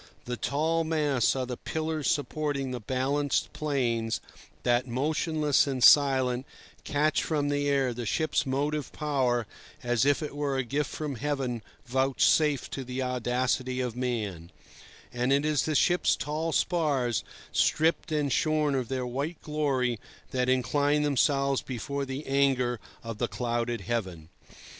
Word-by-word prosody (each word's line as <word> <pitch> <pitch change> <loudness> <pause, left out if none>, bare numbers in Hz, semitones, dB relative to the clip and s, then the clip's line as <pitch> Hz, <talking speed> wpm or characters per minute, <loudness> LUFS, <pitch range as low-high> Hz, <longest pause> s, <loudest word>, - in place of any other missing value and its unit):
The 125 - -3
tall 160 +7 0
masts 150 -7 +1
are 130 -1 -1
the 125 -1 -5
pillars 155 -2 -2
supporting 145 -1 -1
the 125 - -3
balanced 135 +5 0
planes 120 -7 -1 0.4
that, 120 +1 +2
motionless 150 +3 +1
and 130 -3 -1
silent, 130 -3 +5 0.4
catch 150 +1 +1
from 145 -3 0
the 145 0 0
air 135 -3 +2
the 120 -1 -5
ship's 155 +11 +1
motive 145 +2 -1
power, 130 -6 0 0.4
as 120 -1 +2
it 145 +1 +1
were 145 -2 -1
a 130 - +1
gift 140 +4 -1
from 150 -4 -4
Heaven 135 -3 -2 0.2
vouchsafed 135 +3 +2
to 135 - -4
the 130 +1 -3
audacity 125 +1 -1
of 125 -3 -2
man; 105 -9 -3 0.6
and 125 +2 0
it 140 +2 +3
is 155 -2 +1
the 155 - -1
ship's 175 +4 +3
tall 155 +2 -2
spars, 145 - +1 0.3
stripped 160 +2 +2
and 150 -3 +1
shorn 155 -3 +2
of 130 -3 -1
their 130 0 -2
white 140 +7 -3
glory, 135 -6 0 0.3
that 125 -1 0
incline 145 +4 +2
themselves 140 -1 +2
before 140 +3 -4
the 135 +3 -5
anger 135 -3 +2 0.2
of 115 -2 -6
the 120 - +1
clouded 120 -2 -2
heaven. 95 -8 -3
135 Hz, 145 wpm, -28 LUFS, 125-150 Hz, 0.6 s, silent